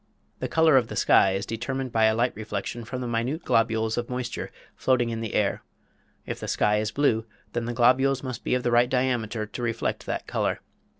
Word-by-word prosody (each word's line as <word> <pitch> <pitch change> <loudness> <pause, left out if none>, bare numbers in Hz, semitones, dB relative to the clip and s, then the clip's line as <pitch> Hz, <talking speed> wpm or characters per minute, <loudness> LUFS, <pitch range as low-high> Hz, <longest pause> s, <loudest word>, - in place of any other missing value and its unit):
The - - -2
color 160 -3 +4
of 120 -3 +2
the - - -7
sky 95 - +4
is 95 +1 -2
determined 130 +4 -3
by 110 -1 +3
a 110 0 +3
light 120 +2 +1
reflection 105 +2 -5
from 130 +3 -5
minute 125 +8 -2
globules 110 0 +1
of 120 - -5
moisture 125 -1 -4 0.3
floating 120 -3 +1
in 115 0 -3
the 115 - -4
air. - - +1 0.6
If - - -5
the - - -6
sky 105 0 +2
is 105 0 -1
blue, 115 -3 +1 0.3
then 120 -1 -2
the 120 - -3
globules 130 +3 +3
must 130 -3 -5
be - - +1
of 125 - -1
the 120 - +1
right 120 +1 +4
diameter 120 -4 0
to 105 +4 -8
reflect 115 -1 -2
that - - -3
color. - - -1
120 Hz, 205 wpm, -26 LUFS, 110-125 Hz, 0.6 s, color